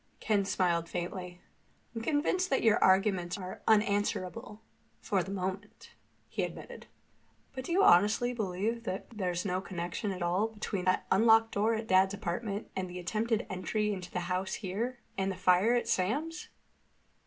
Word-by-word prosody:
Ken 205 -3 +1
smiled 170 -3 0
faintly. 180 0 -5 0.5
"I'm 225 - -4
convinced 320 +8 +1
that 270 - +1
your 220 -2 +4
arguments 190 -2 +3
are 185 -1 -7
unanswerable—for 210 -1 -1
the 175 - -6
moment," 195 +1 -5 0.4
he - - -3
admitted. - - -6 0.7
"But 260 -1 -6
do - - -5
you 385 +3 +4
honestly 210 - +5
believe 220 +2 -2 0.3
there's 180 -4 -2
no 185 -1 -1
connection 180 +2 -4
at 185 -2 -4
all 180 +5 +1
between 210 -4 -4
that 185 - +2
unlocked 225 +2 +5
door 220 +3 +1
at 220 0 -3
Dad's 190 +1 +4
apartment, 200 +2 -4
the 185 -1 -4
attempted 215 +5 -1
entry 210 +3 -1
into 180 -2 -6
the 180 - -3
house 185 +2 -2
here, 225 +6 -3 0.2
and 195 0 0
the - - -5
fire 185 +5 +4
at 240 - 0
Sam's?" 290 - -1
200 Hz, 150 wpm, -31 LUFS, 185-225 Hz, 0.7 s, honestly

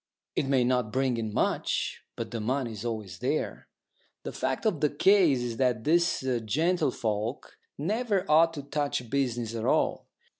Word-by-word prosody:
It 135 - 0
may 135 -2 +3
not 125 -3 +1
bring 130 -1 +1
in 110 -2 -3
much, - - -1
but 115 -1 -5
the 115 -2 -3
money 125 +2 -1
is 105 -1 -7
always 110 -5 -4
there. - - -2 0.6
The - - -5
fact 130 +6 -2
of 185 -9 +1
the 150 - +3
case 165 -4 +4
is 120 -2 -3
that 125 -4 +1
these 170 +4 +2
gentlefolk 125 - -1 0.2
never 205 - 0
ought 160 +2 +5
to 145 - -5
touch 140 -4 -2
business 120 -5 -1
at 115 -1 -3
all. - - +1
130 Hz, 160 wpm, -28 LUFS, 115-150 Hz, 0.6 s, ought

